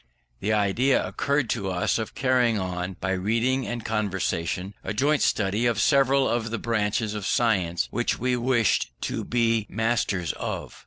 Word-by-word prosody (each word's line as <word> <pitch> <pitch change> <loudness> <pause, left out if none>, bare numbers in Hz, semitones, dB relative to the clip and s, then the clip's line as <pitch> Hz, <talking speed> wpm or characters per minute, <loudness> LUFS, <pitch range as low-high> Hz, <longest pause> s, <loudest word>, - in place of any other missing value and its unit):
The 105 - -1
idea 110 +6 +2
occurred 140 -2 0
to 100 -5 -2
us 90 +4 0
of 110 - -5
carrying 125 -4 +2
on, 90 -1 -3
by 95 - -2
reading 115 +7 0
and 120 -2 -5
conversation, 95 -3 -2
a 100 - -4
joint 145 +6 +2
study 105 +4 +1
of 115 -3 0
several 135 0 +3
of 115 -1 -1
the 115 - -2
branches 110 -1 -1
of 105 -2 -4
science 95 -8 +1
which 120 - 0
we 125 +1 0
wished 120 -3 +1
to - - -3
be 115 -3 +1
masters 105 -5 0
of. - - -5
110 Hz, 160 wpm, -25 LUFS, 100-120 Hz, -, several